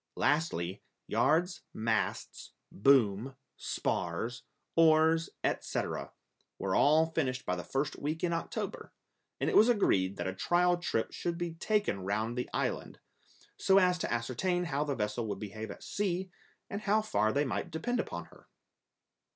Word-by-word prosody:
Lastly, 105 - 0 0.2
yards, 175 +4 +2
masts, 110 0 -2 0.2
boom, 120 0 +3 0.2
spars, 115 +9 -2 0.3
oars, 160 0 +5
etc., - - -2 0.5
were 95 - -2
all 160 +6 +4
finished 130 -4 -1
by 90 - 0
the 90 - -5
first 140 +2 -2
week 155 +4 -3
in 170 -1 +1
October, 165 - -4 0.5
and - - 0
it - - +1
was 225 - +7
agreed 100 - +2
that - - -3
a 95 - -2
trial 175 - +3
trip 145 -10 -1
should 170 -1 -3
be 175 -1 -3
taken 205 - 0
round 105 +5 -1
the 125 - -3
island, - - -2 0.6
so 195 - +4
as 180 -2 +4
to - - -2
ascertain 130 +10 0
how 145 -4 -1
the 145 -2 -2
vessel 105 +1 -2
would 100 -2 -3
behave 110 +1 -6
at 100 - -9
sea, 190 -2 -2 0.4
and 200 - -5
how 215 +1 +2
far 120 - +1
they 145 +4 +1
might 130 - -2
depend 245 +10 -2
upon 85 - -4
her. - - -19
145 Hz, 150 wpm, -31 LUFS, 110-175 Hz, 0.6 s, was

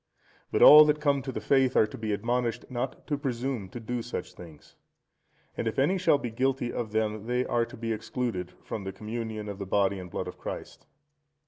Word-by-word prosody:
But - - +3
all 150 +1 +11
that 150 0 +2
come 140 -2 +2
to 130 0 -5
the - - -4
faith 135 -2 +2
are - - +6
to 105 - -9
be 110 -1 -3
admonished 115 +3 -1
not 130 +1 -4
to 145 -2 -2
presume 125 -6 -3
to 120 - -7
do 120 +1 -3
such 115 -6 -6
things. 80 -4 -14 0.8
And - - -2
if 110 - -2
any 175 +8 +2
shall 175 -5 +4
be 120 -4 -5
guilty 130 +1 0
of 110 -3 -3
them, 110 0 -1
they 125 +1 0
are 120 -1 +1
to - - -11
be 115 0 -2
excluded 105 -5 -3
from 105 - -5
the 95 0 -5
Communion 110 +1 -5
of 100 -1 -6
the 100 - -5
Body 100 0 +1
and 90 -1 -8
Blood - - -4
of - - -9
Christ. - - -7
115 Hz, 215 wpm, -28 LUFS, 105-130 Hz, 0.8 s, all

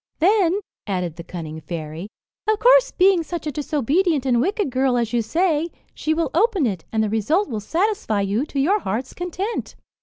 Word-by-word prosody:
"Then," 380 +1 +3 0.3
added 180 -5 -2
the 170 - -8
cunning 160 -3 -7
fairy, 160 +2 -6 0.4
"of 435 - +3
course, - - +6
being 375 -1 +4
such 330 0 -5
a 300 - -1
disobedient 295 - 0
and 240 -3 +3
wicked 395 - 0
girl, 260 -1 +2
as 235 -1 -1
you 240 - +2
say, 325 - +1 0.2
she 310 - -2
will 325 -4 -1
open 390 - +2
it, 190 -8 -2
and 220 -1 +1
the 215 - 0
result 295 - +1
will 225 -6 -3
satisfy 330 - 0
you 200 +6 0
to 280 - -3
your 380 +10 +3
heart's 240 - -3
content." 365 +5 -4
290 Hz, 185 wpm, -22 LUFS, -, 0.4 s, course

